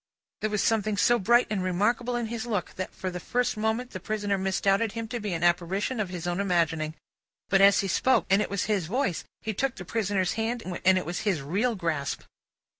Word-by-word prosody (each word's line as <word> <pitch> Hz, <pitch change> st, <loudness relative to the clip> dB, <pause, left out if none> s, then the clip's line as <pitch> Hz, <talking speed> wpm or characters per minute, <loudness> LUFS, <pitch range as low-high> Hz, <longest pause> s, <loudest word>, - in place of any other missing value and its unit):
There 215 Hz, -, -1 dB
was 210 Hz, -1 st, 0 dB
something 215 Hz, -2 st, +1 dB
so 240 Hz, +4 st, +4 dB
bright 240 Hz, +5 st, +4 dB
and 205 Hz, -3 st, 0 dB
remarkable 210 Hz, +7 st, 0 dB
in 240 Hz, -1 st, -1 dB
his 225 Hz, +1 st, -4 dB
look, 205 Hz, -6 st, -2 dB
that, 185 Hz, -, -5 dB
for 185 Hz, -, -5 dB
the 180 Hz, -, -5 dB
first 245 Hz, +7 st, 0 dB
moment, 220 Hz, +3 st, -1 dB
the -, -, -6 dB
prisoner 210 Hz, -2 st, -1 dB
misdoubted 195 Hz, +2 st, +1 dB
him 230 Hz, 0 st, -4 dB
to 240 Hz, -, -3 dB
be 210 Hz, -2 st, -3 dB
an 165 Hz, 0 st, -2 dB
apparition 185 Hz, +7 st, +1 dB
of 205 Hz, -4 st, -1 dB
his 180 Hz, -2 st, -6 dB
own 175 Hz, +1 st, -1 dB
imagining. 165 Hz, -5 st, 0 dB, 0.5 s
But, 195 Hz, 0 st, +4 dB
he 200 Hz, 0 st, +5 dB
spoke, 260 Hz, +7 st, +2 dB
and 195 Hz, +2 st, +5 dB
it -, -, -2 dB
was 200 Hz, -2 st, -1 dB
his 200 Hz, -7 st, 0 dB
voice; 240 Hz, -, -1 dB, 0.2 s
he 220 Hz, -, -3 dB
took 265 Hz, +5 st, -1 dB
the 180 Hz, -, -8 dB
prisoner's 195 Hz, -3 st, 0 dB
hand, 230 Hz, +1 st, -2 dB, 0.2 s
and 190 Hz, +1 st, +5 dB
it 185 Hz, -, -2 dB
was 175 Hz, +2 st, -3 dB
his 190 Hz, -9 st, 0 dB
real 210 Hz, -, 0 dB
grasp. 165 Hz, -7 st, -2 dB
200 Hz, 215 wpm, -27 LUFS, 180-225 Hz, 0.5 s, he